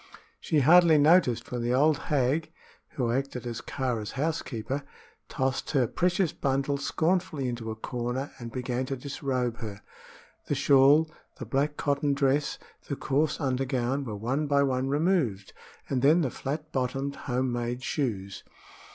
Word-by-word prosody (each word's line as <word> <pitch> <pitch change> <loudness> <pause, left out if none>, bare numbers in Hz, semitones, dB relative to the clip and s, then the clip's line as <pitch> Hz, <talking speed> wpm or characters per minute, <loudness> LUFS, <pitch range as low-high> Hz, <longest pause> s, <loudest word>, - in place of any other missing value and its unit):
She 155 - +1
scarcely 165 +3 +6
noticed 150 -5 +4
when 125 -1 -2
the 120 +1 +1
old 150 +2 +3
hag 150 +3 +1 0.4
who 120 -4 -1
acted 130 -1 -2
as 120 -1 -4
Kāra's 120 -6 -3
housekeeper 140 -3 -2 0.5
tossed 130 0 -1
her 135 -4 +3
precious 175 - 0
bundle 140 0 -1
scornfully 160 -2 0
into 120 -2 -4
a 110 - -4
corner 125 +4 -4
and 120 -1 -7
began 125 +1 -2
to 135 - -2
disrobe 130 -3 -2
her. 105 -3 -7 0.6
The 145 - 0
shawl, 145 +3 +5 0.3
the - - -6
black 145 +2 0
cotton 145 -1 0
dress, 140 +1 +1 0.3
the 140 - -2
coarse 145 +2 0
undergown, 130 -1 -1
were 110 -5 -5
one 130 +8 -1
by 140 0 +3
one 130 -1 0
removed, 145 - 0 0.3
and 130 -2 -1
then 155 +6 +5
the 135 -6 -1
flat 150 +3 -5
bottomed 135 +2 -2
home 125 0 0
made 120 +1 -3
shoes. 100 -10 -3
135 Hz, 150 wpm, -28 LUFS, 125-145 Hz, 0.6 s, scarcely